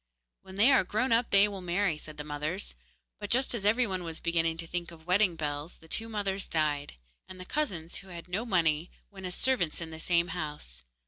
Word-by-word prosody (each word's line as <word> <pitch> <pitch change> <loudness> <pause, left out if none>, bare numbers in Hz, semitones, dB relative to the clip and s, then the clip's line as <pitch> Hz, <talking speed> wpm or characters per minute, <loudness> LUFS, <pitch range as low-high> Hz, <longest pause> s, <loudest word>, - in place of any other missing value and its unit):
'When 190 - -12
they 220 +8 +6
are 265 - +6
grown 215 +7 0
up 230 +1 +3
they 200 +1 +6
will 200 -2 -6
marry,' 180 0 +1
said 155 0 -10
the 150 - -4
mothers; 150 +6 -3 0.5
but 205 - -5
just 260 +2 +3
as 205 -4 0
every 235 +4 +4
one 185 -4 -2
was 165 -1 -5
beginning 165 -1 +1
to 165 - -3
think 170 +1 -3
of 160 -2 -13
wedding 180 0 +3
bells, 150 +1 -3
the 160 - -18
two 225 +7 -2
mothers 200 -3 -2
died, 150 -2 0 0.3
and 185 0 -10
the 185 - -7
cousins, 180 - -2
who 195 - -11
had 175 -2 -8
no 190 +5 -1
money, 170 -6 +2 0.2
went 190 -2 -6
as 180 - -4
servants 235 -12 +1
in 165 -1 -5
the 160 - -8
same 170 +1 +2
house. 150 - -5
180 Hz, 220 wpm, -30 LUFS, 160-200 Hz, 0.5 s, they